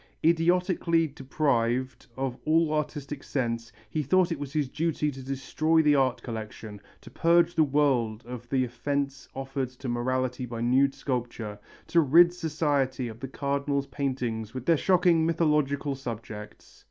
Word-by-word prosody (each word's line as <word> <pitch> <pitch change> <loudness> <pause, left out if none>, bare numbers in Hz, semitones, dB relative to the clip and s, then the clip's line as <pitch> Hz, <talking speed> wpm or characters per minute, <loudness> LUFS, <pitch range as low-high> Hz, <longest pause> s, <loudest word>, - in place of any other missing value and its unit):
Idiotically 170 0 +3
deprived 130 -3 -1
of 135 -2 -2
all 160 0 +2
artistic 145 -2 -3
sense 115 -3 -2 0.2
he 155 +8 -2
thought 180 +5 +2
it 165 - -2
his 150 -2 0
duty 150 +1 -1
to 135 -1 -9
destroy 155 +5 +1
the 150 -1 +5
art 130 -3 +1
collection, 110 -2 -7 0.2
to - - -13
purge 170 0 +3
the 160 - +4
world 130 -6 +1
of 120 0 -8
the 130 -2 +2
offence 140 +2 -3
offered 135 -1 -3
to 130 +1 -9
morality 125 +1 -1
by 115 -1 -6
nude 130 +4 +3
sculpture, 120 -5 -4 0.3
to 170 - +3
rid 170 +4 +6
society 145 -7 -1
of 110 0 -10
the 135 - -5
Cardinal's 140 +1 -1
paintings 125 -5 -3
with 130 -1 -5
their 165 - +5
shocking 175 0 +3
mythological 150 -3 +1
subjects. 110 -5 -8
135 Hz, 145 wpm, -27 LUFS, 125-155 Hz, 0.3 s, rid